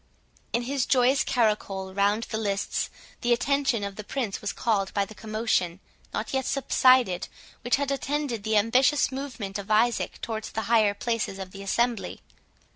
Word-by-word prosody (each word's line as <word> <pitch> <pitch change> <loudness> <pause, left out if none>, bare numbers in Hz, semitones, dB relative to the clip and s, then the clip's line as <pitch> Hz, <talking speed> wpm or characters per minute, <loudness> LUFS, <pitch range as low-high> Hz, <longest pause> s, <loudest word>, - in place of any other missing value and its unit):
In 235 - 0
his 265 +1 -1
joyous 260 +1 +4
caracole 205 -5 0
round 205 +3 +2
the 220 - -1
lists, 200 -2 -1 0.3
the 240 - 0
attention 275 -2 +1
of 200 0 -5
the 210 - -5
Prince 225 -3 -3
was 210 - -2
called 200 -4 0
by 200 -1 +2
the 215 - -12
commotion, 215 -5 -1 0.3
not - - -4
yet 265 -1 0
subsided, 255 -8 +3 0.3
which 245 - +2
had 280 -1 -1
attended 275 -4 -2
the 220 +1 +1
ambitious 255 +7 +3
movement 250 -8 -5
of 200 - -8
Isaac 230 +3 +2
towards 220 -1 -4
the 220 - -1
higher 215 -2 +3
places 230 -3 -2
of 190 -1 -7
the 195 - -9
assembly. 235 +3 -1
225 Hz, 165 wpm, -26 LUFS, 200-255 Hz, 0.3 s, joyous